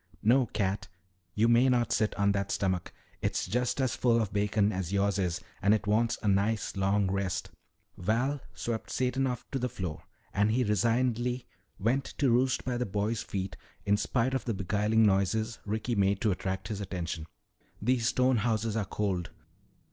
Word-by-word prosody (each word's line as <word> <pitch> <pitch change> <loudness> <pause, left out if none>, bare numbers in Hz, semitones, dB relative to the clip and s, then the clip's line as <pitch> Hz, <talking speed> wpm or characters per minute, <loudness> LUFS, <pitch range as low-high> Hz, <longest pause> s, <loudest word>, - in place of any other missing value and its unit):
No, 125 +3 +4
cat, 100 -1 -1 0.5
you 110 +2 +3
may 120 +3 +5
not 120 -2 +2
sit 110 -1 +1
on 100 0 +2
that 100 -1 -1
stomach. 95 -3 -1 0.3
It's - - 0
just 125 +7 -1
as 130 -4 +1
full 120 -2 +3
of 105 -4 -2
bacon 105 0 +2
as 95 -3 -3
yours 100 0 +1
is 90 -2 0 0.2
and 100 +2 +5
it 110 - -3
wants 110 +3 +2
a - - 0
nice 100 +3 +1
long 95 0 +1
rest." 100 -2 -2 0.5
Val 125 +9 0
swept 115 -2 -3
Satan 130 +1 0
off 125 -2 -4
to 135 - -1
the 125 0 -1
floor 90 -7 -5 0.3
and 105 +1 +3
he 125 +4 +2
resignedly 120 +3 +1 0.3
went 125 +7 +1
to 135 -4 +3
roost 130 +2 +2
by 125 -1 -1
the 125 - 0
boy's 105 +3 -1
feet 95 -1 -4 0.3
in 100 - +4
spite 120 +4 0
of 130 - -1
the 115 -4 -1
beguiling 105 +3 +2
noises 105 +3 +1
Ricky 110 +3 -1
made 100 -2 +2
to 110 - +2
attract 95 +1 -3
his 105 -2 -3
attention. 85 -4 -4 0.5
"These 120 +1 +1
stone 130 -1 +3
houses 110 0 0
are 110 -3 0
cold." 95 -3 -2
105 Hz, 180 wpm, -30 LUFS, 100-120 Hz, 0.5 s, may